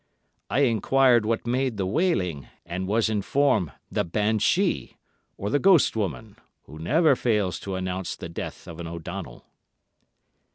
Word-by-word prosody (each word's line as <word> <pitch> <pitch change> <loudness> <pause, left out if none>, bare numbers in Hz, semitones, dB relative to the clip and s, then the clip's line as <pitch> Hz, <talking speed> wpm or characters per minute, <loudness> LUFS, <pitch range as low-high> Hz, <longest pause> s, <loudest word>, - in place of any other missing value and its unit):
I 140 - +1
enquired 120 -1 +3
what 115 0 -1
made 125 -1 0
the 95 - -1
wailing, 95 - 0 0.2
and 90 +2 -4
was 110 +3 +2
informed 110 - +1 0.2
'the - - 0
banshee,' 110 - 0 0.4
or 100 - -3
the 145 - +3
ghost 185 -8 +5
woman, 90 - -4 0.3
who 75 +3 -12
never 150 - +3
fails 105 -8 0
to 95 -1 -5
announce 95 0 -3
the - - -7
death 85 - -7
of 85 - -9
an 85 - -5
O'Donnell. 85 -1 -7
105 Hz, 140 wpm, -25 LUFS, 90-130 Hz, 0.4 s, ghost